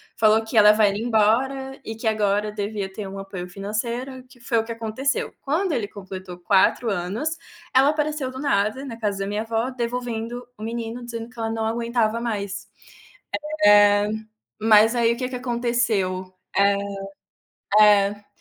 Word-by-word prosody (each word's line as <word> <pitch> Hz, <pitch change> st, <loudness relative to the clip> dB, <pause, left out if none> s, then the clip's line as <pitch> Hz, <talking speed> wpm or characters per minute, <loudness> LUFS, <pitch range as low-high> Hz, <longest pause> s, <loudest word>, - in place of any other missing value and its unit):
falou 220 Hz, 0 st, +4 dB
que 220 Hz, -, -7 dB
ia -, -, +8 dB
levar 210 Hz, 0 st, +6 dB
ele 200 Hz, +1 st, -1 dB
embora, 255 Hz, +4 st, +1 dB
e 225 Hz, -, -6 dB
que 225 Hz, +1 st, -4 dB
agora 210 Hz, -1 st, +1 dB
devia 205 Hz, -1 st, -4 dB
ter 200 Hz, +1 st, -6 dB
um 195 Hz, +1 st, -8 dB
apoio 195 Hz, -2 st, -6 dB
financeiro, 235 Hz, +7 st, -4 dB
que 250 Hz, -1 st, -19 dB
foi 235 Hz, 0 st, -1 dB
o -, -, 0 dB
que 230 Hz, -, -7 dB
aconteceu. 230 Hz, +5 st, -2 dB
Quando 330 Hz, +6 st, 0 dB
ele 215 Hz, -7 st, -1 dB
completou 190 Hz, -2 st, -9 dB
4 195 Hz, +5 st, +3 dB
anos, 200 Hz, -, -2 dB, 0.5 s
ela 270 Hz, +2 st, +6 dB
apareceu 300 Hz, -2 st, -1 dB
do 260 Hz, -, -8 dB
nada, 260 Hz, -2 st, 0 dB
na 230 Hz, -4 st, -7 dB
casa 205 Hz, -3 st, -1 dB
da 195 Hz, -, -2 dB
minha 205 Hz, +1 st, -2 dB
avó, 225 Hz, +2 st, -1 dB
devolvendo 240 Hz, -1 st, -4 dB
o 215 Hz, -, -9 dB
menino 230 Hz, +1 st, -4 dB
dizendo 230 Hz, -1 st, -6 dB
que 245 Hz, -, -15 dB
ela 225 Hz, 0 st, -1 dB
não 225 Hz, -1 st, -2 dB
aguentava 230 Hz, 0 st, 0 dB
mais. 205 Hz, -3 st, -3 dB, 1.0 s
Eh, 205 Hz, 0 st, +6 dB, 0.5 s
mas 220 Hz, +1 st, +6 dB
aí 235 Hz, -1 st, +3 dB
o -, -, -9 dB
que 250 Hz, +1 st, -3 dB
que 255 Hz, -, -5 dB
aconteceu, 235 Hz, -7 st, -1 dB, 0.3 s
é 200 Hz, 0 st, +4 dB, 1.3 s
é. 205 Hz, 0 st, -9 dB
225 Hz, 165 wpm, -23 LUFS, 205-245 Hz, 1.3 s, ia